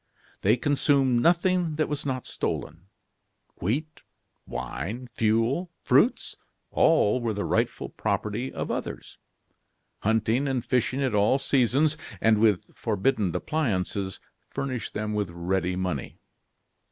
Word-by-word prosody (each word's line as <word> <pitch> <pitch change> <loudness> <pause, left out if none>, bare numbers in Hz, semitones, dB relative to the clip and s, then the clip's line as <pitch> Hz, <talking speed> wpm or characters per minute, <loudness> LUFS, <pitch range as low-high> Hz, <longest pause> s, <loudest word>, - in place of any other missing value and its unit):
They 110 +5 +4
consumed 135 -2 +2
nothing 175 +1 +2
that 155 0 +1
was 145 -1 -3
not 130 -2 -2
stolen. 85 +4 -4 0.7
Wheat, 145 - -2 0.5
wine, 105 - -5
fuel, 115 +11 +1
fruits - - +3 0.4
all 115 +5 +3
were 115 -3 -1
the 100 - -2
rightful - - 0
property 110 +5 -2
of - - -4
others. - - -5 0.8
Hunting 115 +5 +1
and 130 -3 -1
fishing 130 +2 +1
at 130 - 0
all 105 +5 +4
seasons, 140 +3 +2 0.2
and 110 -1 +4
with 105 -4 +2
forbidden 105 -3 0
appliances, 100 - -1 0.3
furnished 130 -5 -4
them 105 0 -2
with 105 -3 -1
ready 90 +1 -1
money. 90 -8 -3
115 Hz, 115 wpm, -26 LUFS, 100-135 Hz, 0.8 s, They